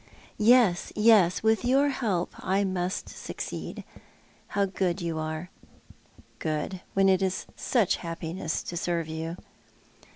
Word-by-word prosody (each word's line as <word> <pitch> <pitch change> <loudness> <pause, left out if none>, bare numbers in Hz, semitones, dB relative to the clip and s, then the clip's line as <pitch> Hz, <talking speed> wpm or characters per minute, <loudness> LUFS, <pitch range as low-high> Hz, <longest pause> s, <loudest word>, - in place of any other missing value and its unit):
" - - -30 0.2
Yes, 200 -9 +2
yes, 210 -5 +5
with 220 +1 +3
your 270 +3 +3
help 205 -10 -1
I 195 +2 +1
must 185 -1 -2
succeed. - - -6 0.6
How 200 0 +1
good 190 -1 -1
you 165 -2 -2
are." 155 +3 -4 0.4
" - - -27
Good, 155 +4 -2
when 195 0 +4
it 190 0 +4
is 190 -1 -1
such 230 -8 +1
liappiness 165 -1 -4
to 175 - -5
serve 170 -1 -1
you." 160 +2 -4
185 Hz, 135 wpm, -27 LUFS, 170-200 Hz, 0.6 s, yes